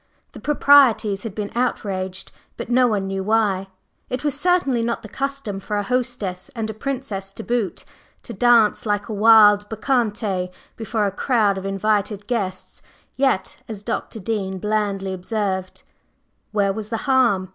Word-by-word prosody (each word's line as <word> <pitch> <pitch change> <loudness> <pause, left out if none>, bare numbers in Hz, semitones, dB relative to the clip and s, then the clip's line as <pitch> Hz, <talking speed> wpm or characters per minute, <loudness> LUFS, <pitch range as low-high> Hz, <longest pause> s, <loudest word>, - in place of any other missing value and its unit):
The - - -11
proprieties 270 -9 +4
had 220 -4 -6
been 210 -1 -4
outraged, 190 -6 -2 0.3
but - - -6
no 250 0 +5
one 205 -4 0
knew 195 0 -3
why. 205 -2 +1 0.4
It 255 +3 -3
was 295 -2 +1
certainly 350 -10 +1
not 235 +1 -2
the - - -7
custom 275 -4 -4
for 210 +2 -3
a 205 - 0
hostess, 240 -7 -2
and 225 -2 -2
a - - -9
Princess 220 -5 -4
to - - -8
boot, 235 -5 -2 0.4
to - - -7
dance 235 -3 +4
like 205 +1 -1
a - - -3
wild 210 -1 +6
bacchante 215 -6 -1 0.3
before 220 -1 -1
a 200 - 0
crowd 205 -2 +1
of 190 - -9
her - - -1
invited 205 0 0
guests, 195 -6 -4 0.3
yet, 265 -7 0
as 210 -3 -7
Dr. 225 0 -4
Dean 195 -2 -2
blandly 200 -1 -1
observed, 190 -1 -3 0.7
"Where 200 -2 +1
was 215 0 -6
the 225 - -1
harm? 240 -9 +3
215 Hz, 160 wpm, -22 LUFS, 195-240 Hz, 0.7 s, wild